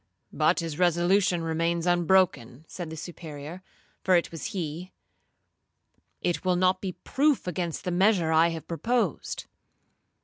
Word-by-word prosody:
'—'But 160 Hz, +3 st, +2 dB
his 165 Hz, -2 st, -5 dB
resolution 175 Hz, 0 st, +2 dB
remains 165 Hz, +1 st, -1 dB
unbroken,' 175 Hz, -7 st, +2 dB
said 175 Hz, -3 st, -7 dB
the 160 Hz, -, -7 dB
Superior, 160 Hz, 0 st, -8 dB, 0.4 s
(for 185 Hz, -, +4 dB
it 170 Hz, -, +1 dB
was 165 Hz, -3 st, -7 dB
he).—'It 175 Hz, 0 st, -8 dB
will 185 Hz, -1 st, +2 dB
not 185 Hz, +1 st, +2 dB
be 190 Hz, -2 st, -3 dB
proof 290 Hz, 0 st, +1 dB
against 175 Hz, -2 st, -3 dB
the 180 Hz, -, -2 dB
measure 180 Hz, -2 st, +3 dB
I 160 Hz, +1 st, +5 dB
have 165 Hz, -2 st, -5 dB
proposed.' 215 Hz, -, -1 dB
175 Hz, 130 wpm, -27 LUFS, 160-185 Hz, 0.4 s, I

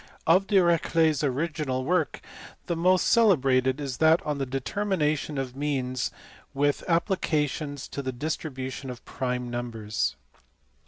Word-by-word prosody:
Of 185 Hz, +4 st, +4 dB
Dirichlet 170 Hz, -4 st, +3 dB
s 150 Hz, -1 st, -3 dB
original 140 Hz, -2 st, -1 dB
work 160 Hz, -4 st, 0 dB, 0.4 s
the 170 Hz, -, -1 dB
most 180 Hz, +2 st, +3 dB
celebrated 135 Hz, -, +3 dB
is 135 Hz, -3 st, -4 dB
that 160 Hz, +1 st, +5 dB
on 150 Hz, -1 st, -2 dB
the 135 Hz, -, -2 dB
determination 150 Hz, +1 st, -1 dB
of 130 Hz, -2 st, -3 dB
means 130 Hz, -3 st, -1 dB, 0.5 s
with 145 Hz, +1 st, +1 dB
applica 165 Hz, -3 st, +1 dB
tions 145 Hz, -1 st, -5 dB
to 140 Hz, -, -4 dB
the 130 Hz, -1 st, -3 dB
distribution 130 Hz, -1 st, -4 dB
of 125 Hz, -2 st, -9 dB
prime 125 Hz, -1 st, -3 dB
numbers. 115 Hz, -3 st, -2 dB
145 Hz, 130 wpm, -27 LUFS, 130-165 Hz, 0.5 s, that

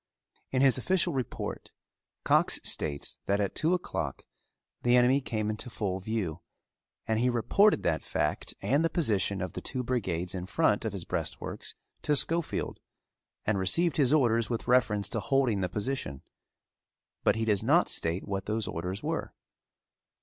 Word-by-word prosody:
In 130 Hz, 0 st, +2 dB
his 130 Hz, -2 st, +5 dB
official 180 Hz, +3 st, +1 dB
report 130 Hz, -3 st, -4 dB, 0.5 s
Cox -, -, +3 dB
states 70 Hz, -2 st, 0 dB
that 100 Hz, +1 st, +2 dB
at 100 Hz, -2 st, -1 dB
two 165 Hz, +3 st, +2 dB
o'clock 180 Hz, -, -4 dB, 0.6 s
the 120 Hz, 0 st, +4 dB
enemy 125 Hz, +3 st, +4 dB
came 110 Hz, -4 st, -2 dB
into 110 Hz, +3 st, -4 dB
full 100 Hz, -5 st, -3 dB
view 95 Hz, -5 st, -3 dB, 0.7 s
and 110 Hz, 0 st, +1 dB
he 125 Hz, +2 st, +3 dB
reported 160 Hz, -, +3 dB
that 80 Hz, -2 st, +1 dB
fact 75 Hz, -, -2 dB
and 145 Hz, +4 st, +2 dB
the 165 Hz, -, +2 dB
position 100 Hz, -, 0 dB
of 90 Hz, -2 st, -4 dB
the -, -, -5 dB
two 130 Hz, -2 st, -3 dB
brigades 95 Hz, -8 st, -2 dB
in 90 Hz, -1 st, -5 dB
front 115 Hz, -, +2 dB
of 110 Hz, -, -2 dB
his 95 Hz, -4 st, -5 dB
breastworks -, -, -4 dB, 0.3 s
to 150 Hz, -, +1 dB
Schofield 165 Hz, +4 st, +1 dB, 0.7 s
and 105 Hz, -2 st, +1 dB
received 165 Hz, -, +3 dB
his 135 Hz, -5 st, +3 dB
orders 115 Hz, -7 st, +3 dB
with 115 Hz, -1 st, -3 dB
reference 110 Hz, -5 st, +3 dB
to -, -, -2 dB
holding 130 Hz, -7 st, +1 dB
the 90 Hz, -, -1 dB
position; 105 Hz, -, -3 dB, 1.0 s
but 105 Hz, -, +4 dB
he 110 Hz, 0 st, -1 dB
does 105 Hz, -3 st, +2 dB
not -, -, +4 dB
state 85 Hz, +3 st, -1 dB
what 95 Hz, -1 st, -3 dB
those 110 Hz, 0 st, -1 dB
orders 90 Hz, +5 st, -4 dB
were. -, -, -3 dB
110 Hz, 160 wpm, -29 LUFS, 95-130 Hz, 1.0 s, his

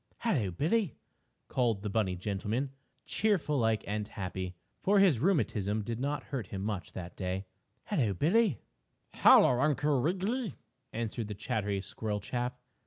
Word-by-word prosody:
"Hello, 140 Hz, -, +1 dB
Billie!" 165 Hz, -, 0 dB, 0.5 s
called 115 Hz, -6 st, +1 dB
the 105 Hz, -, -2 dB
bunny 100 Hz, -4 st, +1 dB
gentleman, 105 Hz, +8 st, -2 dB, 0.3 s
cheerful 185 Hz, -9 st, +1 dB
like 110 Hz, -3 st, +2 dB
and 105 Hz, +1 st, -2 dB
happy, 95 Hz, -2 st, -5 dB, 0.3 s
for 205 Hz, +2 st, +3 dB
his 185 Hz, -, +5 dB
rheumatism 110 Hz, -, +1 dB
did 115 Hz, +1 st, -4 dB
not 145 Hz, +3 st, -1 dB
hurt 120 Hz, -8 st, -2 dB
him 95 Hz, 0 st, -5 dB
much 100 Hz, -4 st, -3 dB
that 90 Hz, -1 st, -7 dB
day. 95 Hz, +1 st, -3 dB, 0.4 s
"Hello, 135 Hz, -, +1 dB
Billie." 175 Hz, -, +3 dB, 0.6 s
"Hello, 125 Hz, -1 st, +7 dB
Uncle 145 Hz, -1 st, +2 dB
Wiggily," 195 Hz, -, -1 dB, 0.4 s
answered 115 Hz, -1 st, -3 dB
the 105 Hz, -, -5 dB
chattery 100 Hz, -1 st, -1 dB
squirrel 105 Hz, +2 st, -3 dB
chap. 125 Hz, +4 st, -3 dB
115 Hz, 140 wpm, -31 LUFS, 100-150 Hz, 0.6 s, Hello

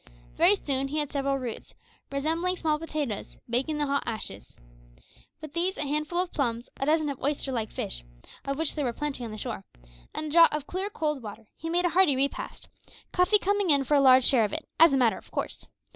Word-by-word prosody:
Very 205 Hz, -, +6 dB
soon 270 Hz, +4 st, -1 dB
he 295 Hz, +3 st, -4 dB
had 295 Hz, -2 st, -1 dB
several 275 Hz, -1 st, 0 dB
roots, 250 Hz, -4 st, -6 dB, 0.4 s
resembling 325 Hz, +6 st, 0 dB
small 305 Hz, -3 st, 0 dB
potatoes, 300 Hz, -9 st, -4 dB
baking 255 Hz, +6 st, 0 dB
in -, -, -3 dB
the 295 Hz, -, 0 dB
hot 280 Hz, 0 st, 0 dB
ashes. 220 Hz, -2 st, -6 dB, 0.8 s
With 310 Hz, -2 st, -9 dB
these, 355 Hz, +3 st, 0 dB
a -, -, -1 dB
handful 300 Hz, +4 st, -2 dB
of 360 Hz, 0 st, 0 dB
plums, 240 Hz, -4 st, -1 dB
a 270 Hz, -, -1 dB
dozen 310 Hz, 0 st, +3 dB
of 280 Hz, -2 st, -4 dB
oyster 280 Hz, 0 st, -1 dB
like 225 Hz, -4 st, -2 dB
fish, -, -, -5 dB, 0.4 s
of 275 Hz, 0 st, -2 dB
which 320 Hz, -1 st, 0 dB
there 295 Hz, -3 st, -2 dB
were 240 Hz, -, -1 dB
plenty 285 Hz, -1 st, -4 dB
on 230 Hz, -, -5 dB
the 215 Hz, -, -7 dB
shore, 230 Hz, -3 st, -5 dB, 0.5 s
and -, -, -3 dB
a -, -, -4 dB
draught 330 Hz, -1 st, +6 dB
of 300 Hz, -2 st, -4 dB
clear 380 Hz, +5 st, -3 dB
cold 300 Hz, -8 st, -2 dB
water, 220 Hz, 0 st, -9 dB
he 325 Hz, -, -6 dB
made 350 Hz, +2 st, +2 dB
a -, -, +3 dB
hearty 345 Hz, -5 st, +4 dB
repast, 275 Hz, +2 st, -3 dB, 0.4 s
Cuffy 365 Hz, +4 st, +4 dB
coming 405 Hz, -1 st, 0 dB
in 280 Hz, -2 st, +4 dB
for 285 Hz, -, -1 dB
a 285 Hz, -, +5 dB
large 260 Hz, -1 st, +7 dB
share 245 Hz, -5 st, +5 dB
of 210 Hz, -, -1 dB
it, 315 Hz, -, -3 dB
as 330 Hz, -1 st, +8 dB
a 270 Hz, -, +3 dB
matter 240 Hz, -4 st, +3 dB
of -, -, -19 dB
course. -, -, -4 dB
290 Hz, 225 wpm, -27 LUFS, 260-320 Hz, 0.8 s, as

